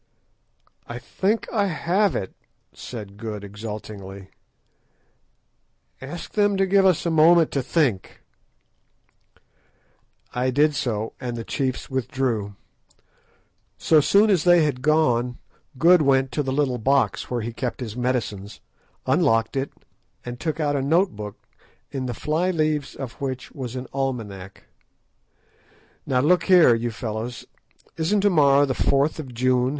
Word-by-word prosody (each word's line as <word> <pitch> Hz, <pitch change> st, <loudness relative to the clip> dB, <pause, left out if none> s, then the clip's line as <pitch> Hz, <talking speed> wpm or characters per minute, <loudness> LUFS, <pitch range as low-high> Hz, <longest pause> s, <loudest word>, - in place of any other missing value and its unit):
"I 120 Hz, -, -6 dB
think 195 Hz, -, -1 dB
that -, -, -12 dB
I 205 Hz, -3 st, +2 dB
have 185 Hz, +3 st, +1 dB
it," 95 Hz, -, -4 dB, 0.4 s
said 105 Hz, -5 st, -9 dB
Good 105 Hz, -2 st, -6 dB
exultingly; 100 Hz, -2 st, -8 dB, 1.7 s
"ask 150 Hz, +6 st, -8 dB
them 205 Hz, -2 st, +2 dB
to 195 Hz, -, +3 dB
give 195 Hz, 0 st, +4 dB
us 180 Hz, -3 st, +2 dB
a 170 Hz, -, +1 dB
moment 165 Hz, +1 st, +5 dB
to 140 Hz, -, 0 dB
think." 130 Hz, -, -1 dB, 2.1 s
I 125 Hz, +1 st, 0 dB
did 150 Hz, +4 st, +3 dB
so, 110 Hz, -6 st, -2 dB
and 120 Hz, -1 st, -4 dB
the 115 Hz, -, -4 dB
chiefs 130 Hz, +1 st, -3 dB
withdrew. 120 Hz, -5 st, -2 dB, 1.2 s
So 155 Hz, -2 st, +4 dB
soon 205 Hz, +8 st, +4 dB
as 180 Hz, -6 st, +2 dB
they 175 Hz, -2 st, +5 dB
had 140 Hz, -4 st, -1 dB
gone 125 Hz, -5 st, +2 dB, 0.4 s
Good 175 Hz, +5 st, +6 dB
went 135 Hz, -2 st, +2 dB
to 150 Hz, -, -1 dB
the 135 Hz, -2 st, -2 dB
little 130 Hz, -3 st, 0 dB
box 115 Hz, -5 st, +1 dB
where 120 Hz, -1 st, -2 dB
he 115 Hz, +1 st, -5 dB
kept 125 Hz, +3 st, -4 dB
his 115 Hz, -4 st, -6 dB
medicines, 120 Hz, -5 st, -3 dB, 0.5 s
unlocked 115 Hz, +2 st, +2 dB
it, 135 Hz, +1 st, -2 dB, 0.5 s
and 120 Hz, 0 st, -6 dB
took 155 Hz, +2 st, -3 dB
out 145 Hz, -2 st, 0 dB
a 140 Hz, -, 0 dB
note 170 Hz, +8 st, +2 dB
book, 105 Hz, -1 st, -7 dB, 0.5 s
in 130 Hz, -2 st, -3 dB
the 120 Hz, -, -4 dB
fly 160 Hz, -, 0 dB
leaves 155 Hz, -4 st, -1 dB
of 135 Hz, -2 st, -8 dB
which 130 Hz, -2 st, -4 dB
was 130 Hz, -3 st, -6 dB
an 130 Hz, 0 st, -5 dB
almanack. 110 Hz, -9 st, -4 dB, 1.4 s
"Now 125 Hz, -1 st, +2 dB
look 170 Hz, +4 st, +3 dB
here, 180 Hz, -9 st, +6 dB
you 115 Hz, +1 st, -1 dB
fellows, 115 Hz, +1 st, -5 dB, 0.5 s
isn't 185 Hz, +6 st, +1 dB
to 205 Hz, 0 st, +3 dB
morrow 145 Hz, -3 st, +5 dB
the 135 Hz, -, -1 dB
4th 140 Hz, +5 st, +1 dB
of 135 Hz, -5 st, -7 dB
June?" 125 Hz, +1 st, +2 dB
130 Hz, 145 wpm, -23 LUFS, 115-155 Hz, 2.1 s, Good